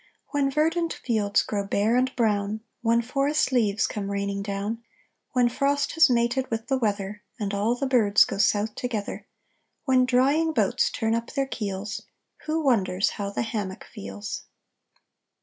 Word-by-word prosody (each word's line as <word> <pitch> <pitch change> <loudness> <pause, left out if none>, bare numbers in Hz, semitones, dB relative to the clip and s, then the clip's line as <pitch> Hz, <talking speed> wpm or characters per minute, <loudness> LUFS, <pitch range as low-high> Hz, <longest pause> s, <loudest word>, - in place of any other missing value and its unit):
When 285 -2 +1
verdant 325 +4 +1
fields 210 -4 +1
grow 205 -2 -2
bare 205 +3 +1
and 255 +1 +2
brown, 215 -2 0 0.2
When 230 0 +2
forest 275 +4 +1
leaves 220 -5 +2
come 200 -2 -4
raining 200 0 -2
down, 205 +3 -3 0.5
When 250 -2 +4
frost 280 +4 0
has 325 -3 +5
mated 245 +2 +1
with 225 0 -3
the 265 - +2
weather 205 -2 -2 0.2
And 205 -2 -2
all 210 +4 +1
the 275 - -2
birds 220 -6 +5
go - - -5
south 210 0 +2
together, 225 -5 -4 0.6
When 255 -2 +4
drying 280 +6 +3
boats 475 +8 +2
turn 225 - -1
up 230 +1 -2
their 275 -1 +1
keels, 205 -5 -4 0.5
Who 315 +1 0
wonders 195 -7 +2
how 200 -2 -4
the 200 - -2
hammock 205 -4 -4
feels? 100 +1 -7
225 Hz, 155 wpm, -26 LUFS, 200-260 Hz, 0.6 s, has